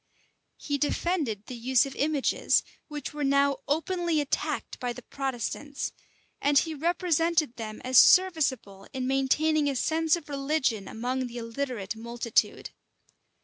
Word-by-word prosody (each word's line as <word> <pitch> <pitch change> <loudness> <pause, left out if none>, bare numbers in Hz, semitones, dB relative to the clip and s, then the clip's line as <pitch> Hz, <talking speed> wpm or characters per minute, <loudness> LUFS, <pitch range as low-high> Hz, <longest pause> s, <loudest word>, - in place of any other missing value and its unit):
He 285 -1 -3
defended 290 - -1
the - - -8
use 245 +1 +2
of 275 - -7
images, 290 -1 +2 0.2
which 295 -2 -6
were 295 0 -3
now 280 0 +3
openly 335 +2 0
attacked 290 -2 -2
by 245 -1 -2
the 250 - -11
Protestants; 275 +2 -4 0.5
and 285 0 +3
he 320 +3 +2
represented 330 -2 +1
them 215 -2 -6
as 255 0 +6
serviceable 275 - +3
in 260 -2 -3
maintaining 290 +3 +2
a 275 - -2
sense 320 +4 +2
of 335 -3 -9
religion 275 -7 -1
among 250 +3 -2
the 240 0 -9
illiterate 230 -3 -4
multitude. 230 0 -1
275 Hz, 135 wpm, -28 LUFS, 245-310 Hz, 0.5 s, as